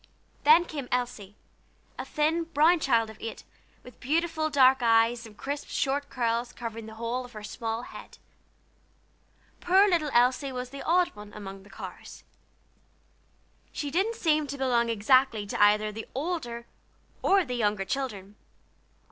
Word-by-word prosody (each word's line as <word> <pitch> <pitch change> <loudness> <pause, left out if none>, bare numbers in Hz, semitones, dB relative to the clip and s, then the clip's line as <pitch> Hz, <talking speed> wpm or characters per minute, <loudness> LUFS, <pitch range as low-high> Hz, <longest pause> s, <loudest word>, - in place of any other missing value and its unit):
Then 320 +4 +7
came 285 -7 -6
Elsie, 240 -5 -3 0.6
a - - -4
thin, 320 +3 0
brown 325 +2 +4
child 230 -6 +1
of 220 - -15
eight, 225 - -7 0.4
with 250 - -14
beautiful 315 +2 0
dark 265 -2 +5
eyes, 230 0 +3
and 210 -2 -16
crisp, 285 +1 -4
short 280 +1 -1
curls 235 0 -1
covering 230 -2 -7
the 220 - -10
whole 235 +3 -3
of 245 0 -13
her 215 -1 -9
small 225 +2 -4
head. - - -11 1.4
Poor 380 +3 +5
little 335 -6 +1
Elsie 255 +3 +2
was 250 -1 -5
the 275 - -8
"odd 355 +2 +2
one" 210 0 -11
among 195 -2 -8
the 200 - -18
Carrs. - - -10 1.5
She 290 -1 -4
didn't 395 +8 0
seem 310 -5 +1
to 280 +1 -5
belong 240 -3 +1
exactly 230 0 +3
to 200 - -3
either 210 +1 +4
the 220 +1 -8
older 260 -6 -3 0.6
or 390 -1 +3
the 250 - -4
younger 210 -4 0
children. 210 -5 -4
250 Hz, 150 wpm, -28 LUFS, 225-295 Hz, 1.5 s, Then